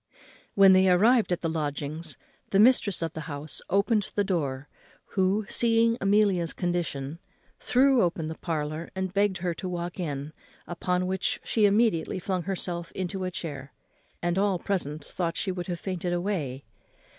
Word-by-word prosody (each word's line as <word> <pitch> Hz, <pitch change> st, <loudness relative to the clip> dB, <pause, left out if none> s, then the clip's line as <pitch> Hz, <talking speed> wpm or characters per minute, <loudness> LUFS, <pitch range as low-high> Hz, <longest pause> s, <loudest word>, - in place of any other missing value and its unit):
When 195 Hz, -1 st, +8 dB
they 185 Hz, 0 st, +5 dB
arrived 215 Hz, +5 st, +4 dB
at 175 Hz, -, 0 dB
the 165 Hz, -, -1 dB
lodgings 155 Hz, 0 st, -3 dB, 0.3 s
the 195 Hz, -, +2 dB
mistress 215 Hz, -6 st, +4 dB
of 165 Hz, -, -3 dB
the -, -, -6 dB
house 145 Hz, +1 st, -3 dB
opened 205 Hz, +2 st, +2 dB
the 205 Hz, -, +2 dB
door, 145 Hz, -8 st, -2 dB, 0.4 s
who, 195 Hz, +2 st, +1 dB
seeing 230 Hz, 0 st, +3 dB
Amelia's 195 Hz, -4 st, +2 dB
condition, 165 Hz, -4 st, -2 dB, 0.4 s
threw 260 Hz, 0 st, +4 dB
open 170 Hz, -3 st, 0 dB
the 160 Hz, -, -4 dB
parlour 155 Hz, -1 st, -4 dB
and 190 Hz, -1 st, -3 dB
begged 200 Hz, -1 st, +2 dB
her 175 Hz, -, +1 dB
to 185 Hz, +2 st, -5 dB
walk 175 Hz, 0 st, -4 dB
in, 145 Hz, -3 st, -4 dB, 0.3 s
upon 180 Hz, +1 st, -1 dB
which 185 Hz, 0 st, -1 dB
she 220 Hz, -2 st, +2 dB
immediately 200 Hz, -6 st, +2 dB
flung 185 Hz, 0 st, -2 dB
herself 175 Hz, -2 st, -4 dB
into 185 Hz, 0 st, -3 dB
a -, -, -1 dB
chair, 145 Hz, -6 st, -6 dB, 0.5 s
and 175 Hz, +2 st, +1 dB
all 200 Hz, -2 st, +2 dB
present 155 Hz, -6 st, -2 dB
thought 170 Hz, -2 st, -3 dB
she 195 Hz, -, -1 dB
would 180 Hz, -1 st, -5 dB
have 175 Hz, -2 st, -3 dB
fainted 180 Hz, -2 st, -3 dB
away. 170 Hz, -, -2 dB
180 Hz, 160 wpm, -27 LUFS, 165-195 Hz, 0.5 s, When